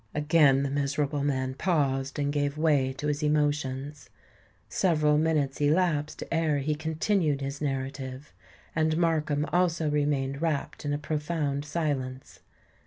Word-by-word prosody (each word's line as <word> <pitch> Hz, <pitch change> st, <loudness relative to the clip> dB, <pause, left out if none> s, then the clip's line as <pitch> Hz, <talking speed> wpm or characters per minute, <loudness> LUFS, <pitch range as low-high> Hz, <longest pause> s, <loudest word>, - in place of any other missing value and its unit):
Again 150 Hz, -2 st, +4 dB
the 140 Hz, -, -2 dB
miserable 145 Hz, +1 st, -1 dB
man 130 Hz, -2 st, -1 dB
paused, 140 Hz, -4 st, 0 dB
and 145 Hz, 0 st, 0 dB
gave 145 Hz, 0 st, -1 dB
way 145 Hz, -4 st, +2 dB
to 135 Hz, +3 st, -6 dB
his 150 Hz, 0 st, -1 dB
emotions. 145 Hz, -2 st, -1 dB, 0.6 s
Several 155 Hz, -5 st, +2 dB
minutes 150 Hz, -4 st, 0 dB
elapsed 150 Hz, 0 st, +1 dB
ere 165 Hz, -3 st, +1 dB
he 145 Hz, +2 st, 0 dB
continued 160 Hz, 0 st, 0 dB
his 140 Hz, +1 st, -4 dB
narrative; 135 Hz, 0 st, -4 dB, 0.4 s
and 155 Hz, 0 st, +2 dB
Markham 155 Hz, -3 st, +1 dB
also 170 Hz, -4 st, +2 dB
remained 145 Hz, -1 st, 0 dB
wrapped 155 Hz, -3 st, -2 dB
in 145 Hz, -, -1 dB
a -, -, 0 dB
profound 150 Hz, -1 st, -2 dB
silence. 140 Hz, -5 st, -3 dB
145 Hz, 130 wpm, -28 LUFS, 140-155 Hz, 0.6 s, Again